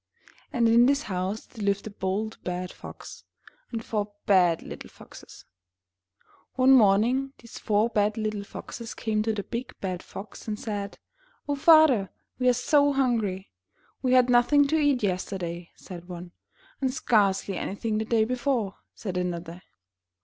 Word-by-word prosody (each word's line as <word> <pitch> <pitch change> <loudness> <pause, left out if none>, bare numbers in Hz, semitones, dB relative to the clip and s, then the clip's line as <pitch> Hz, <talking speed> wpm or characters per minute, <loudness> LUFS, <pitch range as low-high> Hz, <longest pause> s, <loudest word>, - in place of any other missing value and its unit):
And 240 -5 +2
in 235 +2 +6
this 280 +2 +2
house 190 +1 -3
there 220 -4 -9
lived 200 0 0
A 215 - -6
BOLD 205 +3 -3
BAD 180 0 -4
FOX - - -11 0.5
and 230 -2 -5
FOUR 210 -1 -2
BAD 180 -4 +4
LITTLE - - -9
FOXES. - - -14 1.1
One 260 0 +5
morning 250 +4 +4
these 235 - -12
four 210 +1 +2
bad 215 -1 0
little' 215 -2 -2
foxes 230 +3 -8
came 215 -1 -1
to 220 +1 0
the 210 -2 -3
big 245 +4 -6
bad 185 -2 -3
Fox 200 +3 -10
and 210 -1 -3
said: 205 -2 -5 0.5
''Oh, 290 - 0
Father, 280 - +5 0.3
we're 250 -1 +3
so 285 +3 +3
hungry!'' 225 -8 0 0.5
'We 255 -1 +1
had 255 -1 +5
nothing 280 +4 +5
to 315 - +2
eat 285 -5 +2
yesterday," 180 -3 -3
said 175 -1 -11
one. 175 0 -8 0.5
"And 265 -1 +1
scarcely 200 -6 +1
anything 215 +4 -2
the 220 - -2
day 225 -1 +2
before," 245 -4 -1 0.2
said 190 -4 -5
another. 175 -1 -4
215 Hz, 150 wpm, -26 LUFS, 195-250 Hz, 1.1 s, in